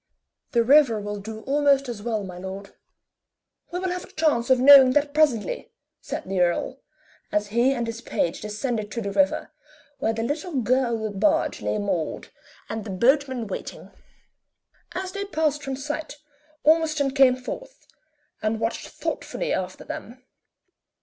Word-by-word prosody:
"The 235 Hz, -1 st, +4 dB
river 260 Hz, -3 st, +5 dB
will 205 Hz, 0 st, -5 dB
do 220 Hz, +2 st, -7 dB
almost 275 Hz, +1 st, +2 dB
as 235 Hz, -4 st, -5 dB
well, 220 Hz, -2 st, -2 dB
my 180 Hz, -2 st, -8 dB
lord." 190 Hz, +2 st, -7 dB, 1.0 s
"We 350 Hz, -, -3 dB
will 370 Hz, 0 st, -2 dB
have 360 Hz, 0 st, -4 dB
a -, -, -19 dB
chance 300 Hz, -7 st, +1 dB
of 260 Hz, -1 st, +5 dB
knowing 265 Hz, -1 st, +9 dB
that 290 Hz, 0 st, +1 dB
presently," 300 Hz, -, +1 dB, 0.3 s
said -, -, -5 dB
the 190 Hz, 0 st, -2 dB
earl, 180 Hz, +9 st, 0 dB, 0.5 s
as 210 Hz, 0 st, 0 dB
he 235 Hz, +5 st, +3 dB
and 240 Hz, -3 st, -2 dB
his 230 Hz, 0 st, -5 dB
page 170 Hz, -, -2 dB
descended 215 Hz, 0 st, -3 dB
to 235 Hz, -, -3 dB
the 200 Hz, -, -3 dB
river, 285 Hz, +6 st, +1 dB, 0.5 s
where 225 Hz, -, +1 dB
the 225 Hz, 0 st, -3 dB
little 295 Hz, +4 st, -2 dB
gilded 230 Hz, -4 st, 0 dB
barge 210 Hz, -, +2 dB
lay -, -, -1 dB
moored, 190 Hz, -6 st, -2 dB, 0.4 s
and 220 Hz, -1 st, -4 dB
the 210 Hz, -, -8 dB
boatman 260 Hz, +4 st, +2 dB
waiting. 200 Hz, -, -7 dB, 1.0 s
As 370 Hz, 0 st, -3 dB
they 400 Hz, 0 st, -4 dB
passed 310 Hz, -5 st, 0 dB
from 270 Hz, -1 st, -4 dB
sight 295 Hz, +3 st, -5 dB, 0.5 s
Ormiston 310 Hz, -3 st, +3 dB
came 265 Hz, -2 st, +5 dB
forth, -, -, -8 dB, 0.6 s
and 215 Hz, +1 st, -1 dB
watched 225 Hz, +1 st, -2 dB
thoughtfully -, -, -3 dB
after 185 Hz, 0 st, -3 dB
them. 250 Hz, +3 st, -8 dB
250 Hz, 155 wpm, -24 LUFS, 215-290 Hz, 1.0 s, knowing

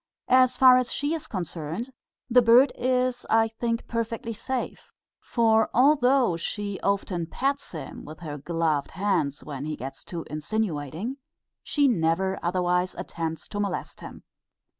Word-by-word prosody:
As 255 Hz, -1 st, +5 dB
far 255 Hz, -1 st, +8 dB
as 250 Hz, -2 st, 0 dB
she 290 Hz, +2 st, -1 dB
is 325 Hz, -, -4 dB
concerned, 175 Hz, -, -4 dB, 0.4 s
the 250 Hz, 0 st, +5 dB
bird 240 Hz, +4 st, +6 dB
is 250 Hz, 0 st, 0 dB
I 225 Hz, 0 st, +4 dB
think 230 Hz, +1 st, -3 dB
perfectly 230 Hz, 0 st, -3 dB
safe; 250 Hz, +3 st, -4 dB, 0.3 s
for 225 Hz, -2 st, +2 dB
although 255 Hz, -, +4 dB
she 200 Hz, +3 st, -4 dB
often 190 Hz, -4 st, -1 dB
pats 275 Hz, -, -2 dB
him 160 Hz, -, -7 dB
with 155 Hz, +3 st, -11 dB
her 150 Hz, -3 st, -6 dB
gloved 160 Hz, -2 st, 0 dB
hand 185 Hz, -8 st, +1 dB
when 140 Hz, -1 st, -6 dB
he 155 Hz, 0 st, -3 dB
gets 135 Hz, 0 st, -8 dB
too 170 Hz, -2 st, -6 dB
insinuating, 165 Hz, -, -3 dB, 0.4 s
she 290 Hz, -2 st, +2 dB
never 190 Hz, -2 st, +1 dB
otherwise 180 Hz, +1 st, 0 dB
attempts 165 Hz, -1 st, -5 dB
to 205 Hz, -, -4 dB
molest 200 Hz, -3 st, -3 dB
him. -, -, -10 dB
205 Hz, 140 wpm, -26 LUFS, 165-245 Hz, 0.4 s, far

